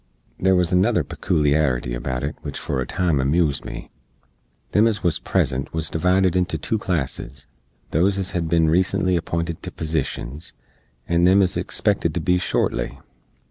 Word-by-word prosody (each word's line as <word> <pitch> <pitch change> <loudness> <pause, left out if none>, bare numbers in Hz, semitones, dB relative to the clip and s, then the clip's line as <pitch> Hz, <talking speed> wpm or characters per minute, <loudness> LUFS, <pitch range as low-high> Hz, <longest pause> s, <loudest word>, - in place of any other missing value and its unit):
There 95 0 +3
wuz 90 -1 +2
another 90 0 +3
pekooliarity 70 -5 0
about 65 +1 -3
it 75 +2 -3
which - - -6
for 65 - -2
a - - -3
time 85 -6 0
amoozed 70 +2 +1
me. - - -8 0.8
Them 105 +3 +4
ez 110 -3 -1
wuz 85 -4 +1
present 65 +1 0
wuz 80 -1 -1
divided 90 +2 +2
into 90 -2 0
2 110 +8 -2
classes 75 -6 -3 0.5
those 95 +5 +2
ez 95 -1 -2
hed 85 -3 -2
bin 80 0 +3
recently 95 +2 +2
appinted 85 -1 -2
to - - -5
posishens, 75 -2 -4 0.5
and 85 +1 +3
them 95 +2 +5
ez 90 - 0
expected - - 0
to - - +1
be 90 0 +2
shortly. - - -1
85 Hz, 160 wpm, -22 LUFS, 75-90 Hz, 0.8 s, them